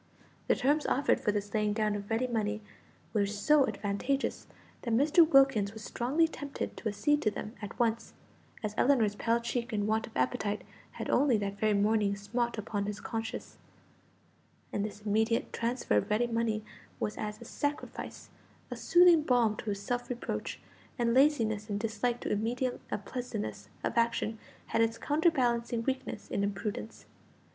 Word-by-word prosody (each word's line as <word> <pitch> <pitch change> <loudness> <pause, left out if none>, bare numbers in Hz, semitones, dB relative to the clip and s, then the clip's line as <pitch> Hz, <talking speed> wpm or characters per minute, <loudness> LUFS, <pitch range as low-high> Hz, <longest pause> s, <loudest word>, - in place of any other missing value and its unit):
The - - +4
terms 295 +3 +2
offered 275 +2 +2
for 210 - +1
this 205 -1 -3
laying 210 -1 +1
down 215 -1 +1
of 205 0 -6
ready 225 +3 +1
money 215 -3 -1 0.5
were 205 -2 +2
so 265 +8 +3
advantageous, 215 +6 -2 0.3
that 235 -2 0
Mr. 310 +5 +5
Wilkins 270 -7 +5
was 220 -1 -9
strongly 280 +11 +1
tempted 285 -3 -5
to 220 - -2
accede 295 +8 +1
to 215 - +3
them 210 +1 -6
at 205 - -7
once; 230 -1 0 0.5
as 210 -1 -2
Ellinor's 240 -7 +4
pale 230 +3 +1
cheek 235 +1 -3
and 205 -2 0
want 220 +2 0
of 225 - -8
appetite 200 +12 0 0.3
had - - -5
only 270 -6 +4
that 200 -1 -3
very 215 -1 +3
morning 205 0 +2
smote 235 +4 -2
upon 205 -1 -2
his 205 0 -4
conscience, 225 -1 -5 1.1
and 205 - 0
this 210 0 -5
immediate 220 +2 +1
transfer 235 - 0
of 105 - 0
ready 215 +3 +2
money 230 -2 -1 0.3
was 210 - -2
as 210 -1 -4
a 235 - -10
sacrifice, 290 +5 -4 0.4
a - - -2
soothing 350 -2 +6
balm 245 -6 +3
to - - -7
his 200 -2 -3
self 245 +2 -2
reproach, 245 -1 -4 0.4
and 235 -2 +2
laziness 230 -6 +3
and 205 0 -1
dislike 225 +2 -1
to - - -3
immediate 240 +4 -1
unpleasantness 150 - -4
of - - -1
action 230 -1 +1 0.3
had 225 - +1
its 225 0 +2
counterbalancing 245 -7 +1
weakness 260 -4 -3
in 200 - 0
imprudence. 210 +3 -4
225 Hz, 165 wpm, -31 LUFS, 210-245 Hz, 1.1 s, soothing